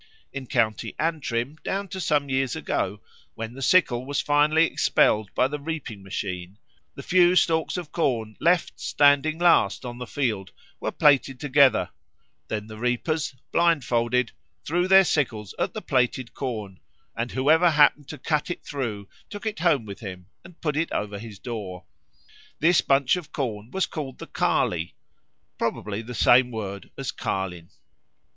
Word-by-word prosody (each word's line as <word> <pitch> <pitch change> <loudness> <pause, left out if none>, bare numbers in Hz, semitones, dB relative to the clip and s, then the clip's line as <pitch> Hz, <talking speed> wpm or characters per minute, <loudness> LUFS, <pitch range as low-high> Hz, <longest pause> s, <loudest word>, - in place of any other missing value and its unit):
In 135 -2 -6
County 110 -4 0
Antrim, 150 -4 -2
down 195 +1 -2
to 190 0 -5
some 150 -3 +1
years 135 -1 0
ago, 105 -10 -2 0.3
when 115 +1 -6
the 135 - -9
sickle 130 -6 +3
was 140 +2 -2
finally 150 +2 +3
expelled 105 -9 +2
by 130 - +3
the 145 +2 -5
reaping 145 -9 -5
machine, 95 -1 -5 0.4
the 140 - -8
few 180 0 +4
stalks 160 -1 +2
of 170 -4 -6
corn 115 -9 -1
left 170 +2 +1
standing 145 +2 +3
last 165 - +3
on 120 0 -6
the 125 - -6
field 110 -10 -2 0.3
were - - -2
plaited 135 -3 +3
together; 140 -4 +3 0.6
then 105 -1 -3
the 110 0 -10
reapers, 130 +4 -1 0.2
blindfolded, 125 -8 +2 0.3
threw 175 +4 +1
their 190 0 +7
sickles 115 - -1
at - - -1
the - - -5
plaited 125 -1 0
corn, 110 -8 -5 0.4
and 120 +1 -3
whoever 155 +6 +4
happened 145 -2 +4
to 155 - -7
cut 150 +4 -1
it 175 - -5
through 115 -8 -4 0.2
took 205 +1 -8
it 220 -1 -3
home 150 -9 +2
with 100 -2 -8
him 90 -5 -8 0.2
and 175 -1 -16
put 150 -3 -1
it 165 +2 -1
over 105 -1 -3
his 110 -2 -9
door. 100 -6 -6 0.7
This 170 +2 +4
bunch 135 +3 +3
of 175 -4 -8
corn 110 -5 -4
was 190 +6 0
called 140 -5 -6
the - - -8
Carley 85 -1 0 0.6
probably 105 +1 -2
the 120 +2 -8
same 125 +4 +5
word 100 -4 -6
as - - -3
Carlin. 90 -3 -4
130 Hz, 160 wpm, -25 LUFS, 110-155 Hz, 0.7 s, their